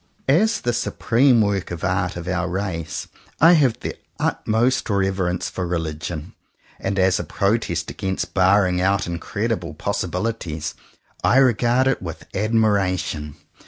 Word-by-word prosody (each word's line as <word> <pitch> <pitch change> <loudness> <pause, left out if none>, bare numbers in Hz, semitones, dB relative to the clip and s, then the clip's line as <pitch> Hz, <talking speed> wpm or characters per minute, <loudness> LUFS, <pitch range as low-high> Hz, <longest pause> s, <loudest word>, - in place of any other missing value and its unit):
As 205 +11 +3
the 120 - 0
supreme 120 +1 +3
work 100 -3 0
of 85 -2 -6
art 90 -1 0
of 85 0 -6
our 90 -1 -1
race, 90 -4 -3 0.3
I 165 +2 +7
have 135 -8 +3
the - - -4 0.2
utmost 120 +4 +1
reverence 95 -3 0
for 90 -2 -4
religion; 80 -1 -4 0.5
and 100 - -2
as 95 -1 +3
a - - -2
protest 105 +3 -1
against 90 -2 -3
barring 95 -1 +3
out 95 0 +2
in 85 -1 -4
credible - - -3
possibilities, 90 -7 -3 0.5
I 130 - +4
regard 125 0 +4
it 135 -1 +1
with 85 -3 -7
ad 105 +3 -1
miration. 95 -9 +1
95 Hz, 140 wpm, -22 LUFS, 90-115 Hz, 0.5 s, I